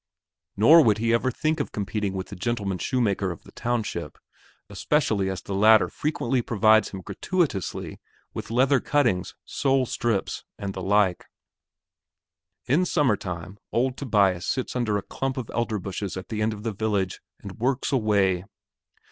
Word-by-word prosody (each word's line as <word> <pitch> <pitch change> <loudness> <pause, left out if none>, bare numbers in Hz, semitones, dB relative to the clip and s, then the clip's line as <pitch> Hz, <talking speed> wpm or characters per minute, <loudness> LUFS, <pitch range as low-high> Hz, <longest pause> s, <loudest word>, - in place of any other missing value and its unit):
Nor 155 +11 +8
would 110 -4 +3
he 115 +1 +1
ever 115 +2 +2
think 155 +5 -1
of 145 - -2
competing 100 -1 -2
with 95 -1 -5
the 100 - -7
gentleman 100 -2 -2
shoemaker 105 -7 0
of 85 - -7
the - - -15
township, 120 -3 -3 0.5
especially 110 -10 0
as 95 -3 -5
the 100 - -5
latter 110 +2 +5
frequently 135 -4 -1
provides 110 -1 +3
him 95 - -7
gratuitously 105 - -2 0.3
with - - -6
leather 130 +4 +3
cuttings, 125 -12 0
sole 135 -2 +1
strips, 115 -4 -2
and 100 -1 -4
the 95 - -6
like. 95 -1 +2 1.4
In 145 +10 +3
summertime, 100 - -1
old 125 +2 +1
Tobias 100 -10 +1
sits 130 -1 -2
under 115 -4 +1
a 100 - -4
clump 135 0 -3
of 125 -4 -5
elder 115 -2 -1
bushes 95 0 -5
at 95 -1 -8
the 110 -1 -3
end 110 +1 +1
of 105 -1 -8
the 115 -2 -2
village 100 -3 -1 0.2
and 100 0 -10
works 130 +3 0
away. 100 -7 +2
110 Hz, 155 wpm, -25 LUFS, 95-125 Hz, 1.4 s, Nor